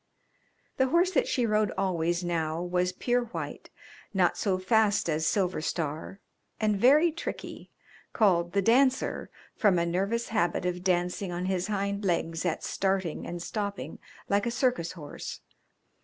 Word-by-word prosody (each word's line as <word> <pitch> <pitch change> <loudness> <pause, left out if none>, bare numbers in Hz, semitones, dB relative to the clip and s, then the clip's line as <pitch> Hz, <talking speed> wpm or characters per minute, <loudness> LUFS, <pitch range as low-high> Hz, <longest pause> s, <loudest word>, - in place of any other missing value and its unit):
The 265 - +3
horse 345 +6 +3
that 300 - +2
she 245 - +1
rode 215 -1 +2
always 175 -2 0
now 165 -2 -1
was 180 +1 0
pure 245 +6 0
white, 235 - -6 0.5
not 180 -2 +3
so 195 -3 0
fast 205 +1 +2
as 160 0 0
Silver 185 -4 +1
Star 160 +4 -3 0.4
and 215 -1 +2
very 290 - +5
tricky, 330 - -6 0.4
called 175 -6 +2
The 200 0 +2
Dancer, 260 +4 +2 0.3
from 205 -6 +3
a 170 - +2
nervous 195 +7 -1
habit 190 -4 0
of 180 0 -2
dancing 180 +1 0
on 175 +1 -3
his 185 -1 -1
hind 200 0 -2
legs 165 -2 -1
at 165 - -2
starting 190 -4 -1
and 175 0 -5
stopping, 200 -1 -4 0.3
like 200 +2 +1
a - - +2
circus 245 - 0
horse. 150 -5 -8
190 Hz, 150 wpm, -28 LUFS, 175-220 Hz, 0.5 s, very